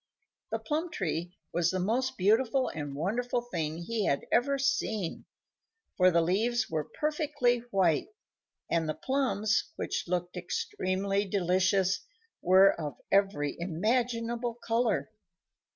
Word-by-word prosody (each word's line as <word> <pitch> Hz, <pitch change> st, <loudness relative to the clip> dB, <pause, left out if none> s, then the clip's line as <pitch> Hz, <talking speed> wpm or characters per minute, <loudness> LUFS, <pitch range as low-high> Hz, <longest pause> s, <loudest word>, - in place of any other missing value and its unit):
The -, -, 0 dB
plum 320 Hz, +3 st, -2 dB
tree 175 Hz, -, -3 dB, 0.2 s
was 175 Hz, 0 st, +2 dB
the 185 Hz, -, -1 dB
most 235 Hz, +8 st, 0 dB
beautiful 225 Hz, +7 st, +3 dB
and 145 Hz, -3 st, -5 dB
wonderful 235 Hz, +11 st, -1 dB
thing 165 Hz, -9 st, -3 dB
he 210 Hz, +5 st, -2 dB
had 140 Hz, -, 0 dB
ever 275 Hz, +3 st, +3 dB
seen, 265 Hz, -9 st, -1 dB, 0.7 s
for 185 Hz, -1 st, +5 dB
the 170 Hz, -1 st, +3 dB
leaves 220 Hz, +7 st, +1 dB
were 155 Hz, -2 st, 0 dB, 0.2 s
perfectly 295 Hz, -5 st, +1 dB
white, 185 Hz, -, +2 dB, 0.6 s
and 165 Hz, -2 st, 0 dB
the 155 Hz, -, -1 dB
plums, 255 Hz, -6 st, +1 dB
which -, -, -3 dB
looked 175 Hz, 0 st, -2 dB
extremely 190 Hz, +3 st, -1 dB
delicious, 190 Hz, 0 st, +2 dB, 0.4 s
were 190 Hz, +2 st, +6 dB
of 150 Hz, -6 st, -6 dB
every 195 Hz, -8 st, +2 dB
imaginable 230 Hz, +6 st, -1 dB
color. 230 Hz, -1 st, 0 dB
195 Hz, 120 wpm, -30 LUFS, 175-240 Hz, 0.7 s, were